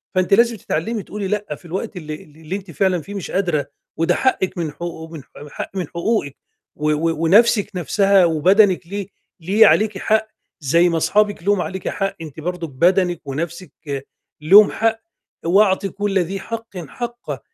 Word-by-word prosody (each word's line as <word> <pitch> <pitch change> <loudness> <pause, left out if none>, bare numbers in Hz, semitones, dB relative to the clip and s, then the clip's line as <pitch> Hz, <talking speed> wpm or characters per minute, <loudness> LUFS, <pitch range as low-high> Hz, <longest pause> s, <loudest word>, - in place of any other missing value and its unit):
فأنتِ 185 +1 +2
لازم 235 +1 +4
تتعلّمي 200 +5 -3
تقولي 205 -2 -5
لأ 205 -6 -3
في - - -22
الوقت 190 +4 -5
اللي 155 -2 -6
ال 150 -1 -21
اللي 160 +4 -5
أنتِ 190 -3 -8
فعلًا 185 0 +1
فيه 205 - -10
مش 195 - -5
قادرة، 175 -6 0 0.3
وده 165 - +2
حقِّك 190 -9 0
من 160 -3 -2
حقو 165 -1 -7 0.3
حق - - -6
من 180 -5 -2
حقوقِك 170 - -2 0.4
و 150 +1 0
و 165 +2 +1
ونَفسِك 205 +4 +4
نَفْسها 195 +2 +3
وبَدَنِك 180 +3 +3
ليه، 200 0 -5 0.3
ليه 200 +6 +4
عليكِ 215 -2 +2
حق، 220 +2 +1 0.3
زي 165 +5 +3
ما 165 -1 0
صحابِك 205 -1 +1
لهُم 200 -2 +2
عليكِ 190 0 -4
حق 195 0 -2
أنتِ 155 -1 -9
برضه 175 +1 -4
بَدَنِك 175 +5 +1
ونَفسِك 170 +6 -5 0.7
لهُم 200 +7 +7
حق، 225 0 0 0.5
وأعطي 195 +2 +3
كُلّ 200 +1 -1
ذي 185 +3 -2
حقٍ 225 -1 -7
حقَّه. 235 - -6
185 Hz, 165 wpm, -20 LUFS, 165-205 Hz, 0.7 s, لهُم